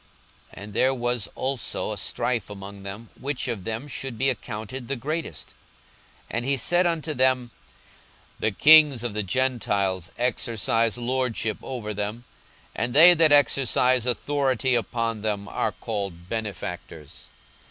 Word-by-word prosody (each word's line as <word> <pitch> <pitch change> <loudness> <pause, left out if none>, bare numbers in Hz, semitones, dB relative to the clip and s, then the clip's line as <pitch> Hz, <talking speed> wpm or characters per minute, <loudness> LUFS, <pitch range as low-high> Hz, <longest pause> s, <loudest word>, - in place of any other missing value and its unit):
42:022:024 - - -9
And 105 0 -9
there 130 +5 +3
was 120 -2 -1
also 130 -2 -2
a - - -4
strife 120 -4 -1
among 100 0 -9
them, 100 +3 -8
which 140 -1 -3
of 110 -7 -4
them 115 +5 -4
should 135 -3 -5
be 135 +2 +2
accounted 120 +1 -6
the 140 - -2
greatest. 145 - -4
42:022:025 - - -20 0.8
And 120 +1 -2
he 140 +1 +1
said 175 +8 +2
unto 165 -2 -1
them, 130 -2 +2 0.9
The 110 - +1
kings 150 +1 +6
of 120 -3 -3
the 105 - -1
Gentiles 100 -5 -1
exercise 115 -1 0
lordship 120 -3 -1
over 115 -5 -5
them; 105 +3 -4 0.5
and 120 +1 -2
they 170 +4 +10
that 160 -2 +4
exercise 130 -3 +3
authority 130 0 +1
upon 115 -2 -1
them 105 -2 -2
are - - -1
called 100 -6 -5
benefactors. 90 -8 -6
120 Hz, 140 wpm, -25 LUFS, 105-130 Hz, 0.9 s, they